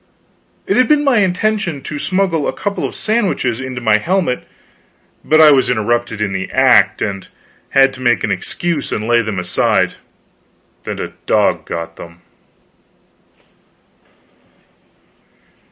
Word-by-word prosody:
It - - 0
had 255 -1 +4
been 300 -1 +3
my 270 -6 +3
intention 185 -5 -1
to 150 0 -6
smuggle 185 -5 0
a - - -2
couple 200 -1 -3
of - - -6
sandwiches 195 - -1
into 130 -2 -6
my 110 -2 +3
helmet, 170 - -1 0.8
but 155 - +3
I 155 -1 +8
was 135 -2 +3
interrupted 120 -1 -1
in 100 -2 -1
the 95 0 -4
act, 125 -7 +3
and 100 -2 -4 0.4
had 135 0 +4
to 130 - -11
make 120 -6 +1
an - - -1
excuse 170 -4 -3
and 105 +1 -3
lay 120 0 +3
them 110 -3 -4
aside, 90 0 +1 0.9
and - - -4
a - - -5
dog - - +1
got 85 0 -6
them. 85 0 -12
130 Hz, 135 wpm, -16 LUFS, -, 0.9 s, I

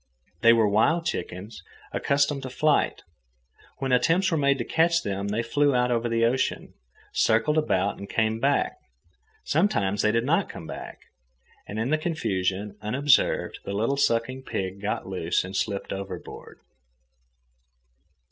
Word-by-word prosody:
They 115 - +7
were 115 -2 +4
wild 160 +12 +2
chickens, 100 - -5 0.3
accustomed 140 0 +1
to 130 - -6
flight. 145 +4 +1 0.7
When 135 -1 -2
attempts 165 +10 +3
were 165 - +1
made 140 -1 +2
to 120 - -2
catch 165 +1 +2
them, 100 0 -3
they 105 +3 -1
flew 145 +3 +2
out 125 0 +2
over 120 0 0
the 115 0 +2
ocean, 130 +3 -1 0.4
circled 115 +8 +2
about, 100 -9 0
and 100 - -8
came 110 0 0
back. 140 +3 +1 0.7
Sometimes 105 - +1
they 105 - +3
did 115 +2 0
not 165 +7 +1
come 80 - -8
back. - - -8 0.7
And 105 - -6
in 115 +5 -1
the 155 - +2
confusion, 100 - -2
unobserved, 130 +6 +2
the 100 - -5
little 115 +7 0
sucking 130 0 0
pig 95 -6 -4
got 105 +1 -2
loose 90 -2 -1
and 95 +2 -7
slipped 100 0 -2
overboard. 100 0 -8
115 Hz, 145 wpm, -26 LUFS, 100-140 Hz, 0.7 s, They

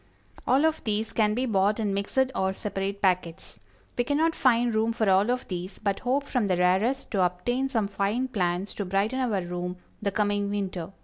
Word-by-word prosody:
All 270 +5 +4
of 320 0 0
these 215 0 -1
can 210 -1 +2
be 255 +2 0
bought 210 -1 +2
in 205 -3 0
mixed 255 +7 0
or 190 -4 0
separate 200 0 -4
packets. 180 -3 -1 0.4
We 245 - +1
cannot 310 +5 +1
find 240 -4 +2
room 220 +1 +1
for 220 -2 0
all 195 +3 +4
of 250 +1 -1
these, 185 +1 -5
but 200 -1 -1
hope 265 +3 0
from 250 -6 -1
the 185 -2 +1
rarest 190 +9 +1
to 195 -5 +2
obtain 245 +10 0
some 225 -6 0
fine 200 +6 -1
plants 185 -4 -1
to 205 - -4
brighten 200 +7 0
our 220 -8 0
room 180 +1 -4 0.2
the 205 - 0
coming 205 0 0
winter. 190 -3 -3
205 Hz, 195 wpm, -27 LUFS, 190-245 Hz, 0.4 s, All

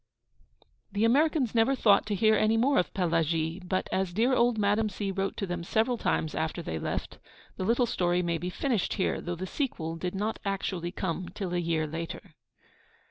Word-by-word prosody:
The 205 +2 +1
Americans 280 0 +3
never 235 +4 +3
thought 210 -5 +4
to 210 - 0
hear 215 +3 +4
any 215 +1 +3
more 270 +5 +3
of 180 - -1
Pelagie; 165 -1 0
but, 185 +1 -1
as 190 -2 0
dear 235 +7 +2
old 240 -2 +3
Madame 210 +1 +2
C. 200 0 -3
wrote 195 0 -2
to 200 - -1
them 175 -2 -4
several 225 +6 +1
times 160 - 0
after 160 +2 -2
they 80 - -3
left, - - -4 0.4
the - - -2
little 240 +4 +3
story 180 -5 +1
may 170 -1 -1
be 180 - -3
finished 230 +1 -1
here, 190 - 0
though 175 0 -3
the 185 +2 -5
sequel 175 - -3
did 180 +2 -3
not 210 +3 -2
actually 190 -3 -2
come 185 -1 -3
till 180 -1 -5
a 175 - +1
year 165 -2 0
later. 165 +1 -6
190 Hz, 190 wpm, -29 LUFS, 175-220 Hz, 0.4 s, thought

